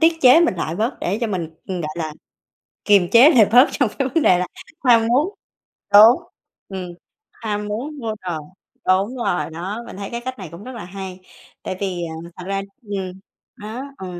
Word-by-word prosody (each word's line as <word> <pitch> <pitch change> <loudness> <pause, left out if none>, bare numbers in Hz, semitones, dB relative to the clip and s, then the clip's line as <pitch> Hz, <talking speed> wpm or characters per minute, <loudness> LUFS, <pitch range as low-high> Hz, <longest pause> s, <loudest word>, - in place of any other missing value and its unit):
tiết 325 0 +3
chế 255 +5 +7
mình 340 - +3
lại 165 -1 -3
bớt 225 +6 -1
để 195 +4 -1
cho 235 - 0
mình, 180 -6 -3 0.2
gọi 170 -5 -4
là, 160 -2 -3 0.7
kiềm 200 -4 +4
chế 250 +6 +8
lại 235 -9 +6
bớt 250 +4 +7
trong 260 -7 +1
cái 275 -2 +1
vấn 325 +4 +1
đề 180 - +5
là 180 - -1 0.4
ham 230 -3 +5
muốn 290 - +1 0.6
đúng, 225 +11 +8 0.4
ừm, 190 -2 -6 0.4
ham 210 -2 -4
muốn 265 +9 -4
mua 225 -4 -3
đồ, 175 -3 -3 0.5
đúng 195 +7 +2
rồi. 180 -9 -1
Đó, 185 +7 -5
mình - - -9
thấy 200 0 -6
cái 235 - -4
cách 255 +1 -6
này 190 -4 -7
cũng 170 +5 -10
rất 255 - -8
là 215 - -7
hay. 190 0 -8 0.4
Tại 185 - -4
vì, 185 -3 -2
à, - - -7 0.2
thật 180 - -8
ra 195 0 -2 0.2
ừm, 190 -3 -5 0.4
đó. 220 +5 -7
Ờ, 190 - -7
205 Hz, 200 wpm, -21 LUFS, 185-245 Hz, 0.7 s, chế